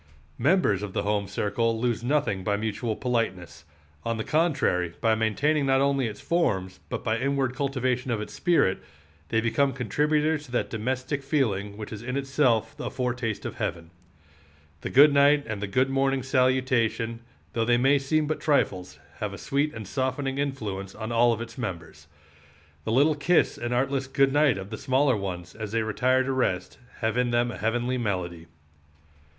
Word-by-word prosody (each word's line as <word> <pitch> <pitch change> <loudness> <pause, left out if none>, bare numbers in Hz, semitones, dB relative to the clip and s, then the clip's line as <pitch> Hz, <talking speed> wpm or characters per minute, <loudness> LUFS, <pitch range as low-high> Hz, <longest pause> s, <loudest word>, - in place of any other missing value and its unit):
Members 130 - +3
of 105 -2 -5
the - - -1
home 100 -1 0
circle 115 +4 -1
lose 120 -1 -1
nothing 130 -8 0
by 100 +1 0
mutual 110 +1 -2
politeness; 115 - -2 0.4
on 115 0 -2
the 110 - -2
contrary, 135 - +1
by 115 -1 +3
maintaining 135 +7 +1
not 135 0 +4
only 135 -2 +2
its 105 -2 -7
forms, 95 - -1
but - - -4
by 110 +1 0
inward 135 -1 0
cultivation 130 -2 -1
of 115 -3 0
its 105 - -6
spirit, 165 - +2 0.5
they 110 - +2
become 135 +5 +2
contributors 150 +5 0
to 125 - -15
that 120 - -1
domestic 130 +5 -2
feeling 105 -8 -1
which 110 0 -7
is 105 - -7
in 125 +3 -3
itself 135 -1 +1
a - - -3
foretaste 125 -4 -3
of - - -5
heaven. 85 -1 -4 0.9
The - - -5
good 145 +2 +7
night 145 +1 +5
and 110 -3 -5
the 100 - -2
good 130 +6 +1
morning 135 -1 +1
salutation, 125 -3 +1 0.3
though 115 - +1
they 120 +1 +3
may 135 +3 +4
seem 155 +3 +1
but 155 +1 -2
trifles, 95 - 0 0.2
have 105 -2 -3
a - - -7
sweet 145 +2 0
and 110 -6 -8
softening 135 +3 -2
influence 105 -9 -3
on 110 +1 -5
all 115 -1 +3
its 115 +1 -8
members. 85 -9 -6 0.8
The - - -1
little 145 +6 +4
kiss 160 +4 +2
and 120 0 -4
artless 135 +2 0
good 135 0 +2
night 145 -7 +4
of 95 +2 -7
the 110 - -5
smaller 130 0 +2
ones, 90 -3 -5
as 110 -1 -6
they 115 -1 +1
retire 130 +4 +2
to 135 - -2
rest, 95 -8 -1 0.2
have 110 +1 0
in 125 -1 +2
them 120 0 +1
a - - -7
heavenly 120 +4 0
melody. 90 -6 -3
120 Hz, 180 wpm, -26 LUFS, 105-135 Hz, 0.9 s, good